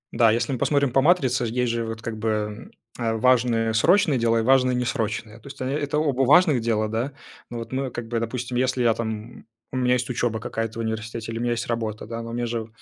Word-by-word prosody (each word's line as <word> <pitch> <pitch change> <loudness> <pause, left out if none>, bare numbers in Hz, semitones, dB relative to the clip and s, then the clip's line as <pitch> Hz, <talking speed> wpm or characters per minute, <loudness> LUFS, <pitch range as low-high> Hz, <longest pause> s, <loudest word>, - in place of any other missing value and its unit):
Да, 115 -1 +5
если 115 +5 0
мы 130 - -1
посмотрим 140 -1 +2
по 135 - +3
матрице, 135 -6 +3
есть 120 +1 0
же, 115 0 -2
вот, 115 0 -6
как 115 -1 -5
бы, 105 0 -2 0.3
э, 115 -2 0
важные 115 -1 +2
срочные 155 - +4
дела 115 0 +2
и - - +2
важные 130 +1 +3
несрочные. 115 -3 -2
То 115 - -15
есть, 140 - -10
э, - - -1
это 145 +2 -1
оба 140 -4 +1
важных 150 0 +5
дела, 110 -2 0
да. 115 +6 -2 0.4
Ну, 120 - -5
вот 115 - -7
мы, 130 0 -2
как 120 -1 -6
бы, 115 -1 0
допустим, 120 +2 -3
если 130 0 +1
я, 115 -1 +4
там, 115 0 -3
м, 110 +3 -10 0.3
у 130 - -3
меня 125 -1 +2
есть 125 0 -1
учеба 120 -2 -1
какая-то 115 0 -4
в - - -1
университете 110 0 -4
или 115 - -4
у - - -3
меня 120 0 +1
есть 115 0 -3
работа, 110 -2 -3
да, 115 +1 -5
но 115 0 -7
мне 120 0 -1
же 115 -1 -3
120 Hz, 245 wpm, -24 LUFS, 115-130 Hz, 0.4 s, Да